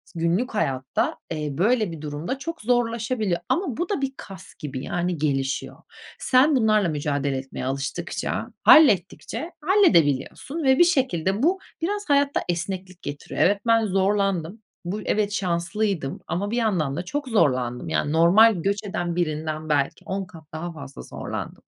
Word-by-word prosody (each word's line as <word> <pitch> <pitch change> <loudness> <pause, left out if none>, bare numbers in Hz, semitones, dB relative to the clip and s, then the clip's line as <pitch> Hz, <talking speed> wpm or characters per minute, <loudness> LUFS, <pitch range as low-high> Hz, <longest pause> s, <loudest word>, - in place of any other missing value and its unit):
günlük 170 +10 0
hayatta, 130 -8 -1
eee, 155 -2 -2
böyle 215 0 +2
bir 160 -3 -8
durumda 155 - -4
çok 330 +3 -6
zorlaşabiliyor 230 -4 0
ama 340 - 0
bu 350 - -2
da 400 -9 -1
bir 270 -1 -1
kas 190 -1 -11
gibi 135 -3 -5
yani 175 +1 -2
gelişiyor. 135 -3 -1 0.4
Sen 275 +4 +4
bunlarla 215 -6 +3
mücadele 145 -2 -1
etmeye 130 -1 -6
alıştıkça, 135 +1 -3 0.2
hallettikçe 300 - +4
halledebiliyorsun 295 - +2
ve 265 0 +4
bir - - +9
şekilde 230 - +1
bu 365 +5 +3 0.2
biraz 410 +2 -2
hayatta 285 0 +3
esneklik 185 +1 -4
getiriyor. 145 0 -5
Evet, 200 +2 +3
ben 230 -1 +4
zorlandım. 195 -1 0 0.2
Bu 190 +5 -3
y - - -8
evet 210 -1 +1
şanslıydım 175 -3 -1
ama 200 +4 -2
bir 235 - -1
yandan 180 - 0
da 175 +3 -4
çok 290 +7 -3
zorlandım. 125 - +1
Yani, 80 - 0
normal 185 +8 +6
göç 200 +4 -1
eden 175 -4 -3
birinden 155 -2 -2
belki 145 +5 0
10 195 -1 -3
kat 170 -3 -14
daha 170 +2 -4
fazla 140 -3 -9
zorlandım. - - -7
185 Hz, 150 wpm, -24 LUFS, 155-230 Hz, 0.4 s, bir